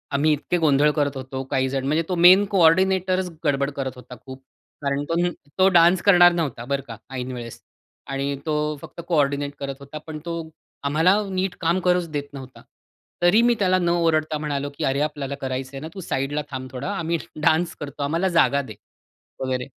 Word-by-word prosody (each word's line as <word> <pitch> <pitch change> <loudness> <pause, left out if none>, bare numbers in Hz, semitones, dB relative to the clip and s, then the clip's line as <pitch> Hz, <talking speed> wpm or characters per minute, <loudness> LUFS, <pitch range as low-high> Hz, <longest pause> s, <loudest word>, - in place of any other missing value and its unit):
आम्ही 150 +3 +3
इतके 150 +4 -1
गोंधळ 150 -2 +3
करत 145 -2 0
होतो 130 0 -5
काहीजण." 130 0 0
म्हणजे 155 +3 +1
तो 180 - 0
मेन 180 +4 +7
कोऑर्डिनेटरच 185 +1 +3 0.2
गडबड 140 -1 +1
करत 135 -1 -2
होता 125 0 -11
खूप. 130 0 -10 0.4
कारण 140 0 -1
तो 165 - 0
न 175 +1 0
डान्स 170 +1 +5
करणार 175 -3 +7
नव्हता, 145 -9 -3
बरं 140 +1 -1
का, 115 - -8 0.2
ऐन 125 0 -4
वेळेस. 120 -2 -8 0.5
आणि 140 +1 -2
तो 155 - -1 0.3
फक्त - - -9
कोऑर्डिनेट 145 -3 0
करत 140 -1 -4
होता. 140 +2 -9
पण 155 -1 -6
तो 170 -1 -3 0.4
आम्हाला 160 +7 +3
नीट 185 -1 -2
काम 170 +2 +2
करूच 180 -2 +1
देत 145 -1 -5
नव्हता. 130 -2 -10 0.6
तरी 175 +6 +5
मी 240 0 +4
त्याला 185 -2 +3
न 175 -1 +1
ओरडता 160 -3 +1
म्हणालो 145 -2 -3
की - - -3
"अरे, 135 +1 +1
आपल्याला 145 -2 -3
करायचंय 130 +1 -4
ना, 155 - -7
तू 195 - -8
साइडला 145 -2 -2
थांब 130 -1 -5
थोडा, 130 +6 -5
आम्ही 170 -1 -1 0.2
डान्स 165 +2 +2
करतो, 145 0 -6
आम्हाला 165 +6 0
जागा 165 -5 +3
दे 115 -6 -10 0.7
वगैरे." 130 -1 -2
150 Hz, 180 wpm, -23 LUFS, 135-175 Hz, 0.7 s, मेन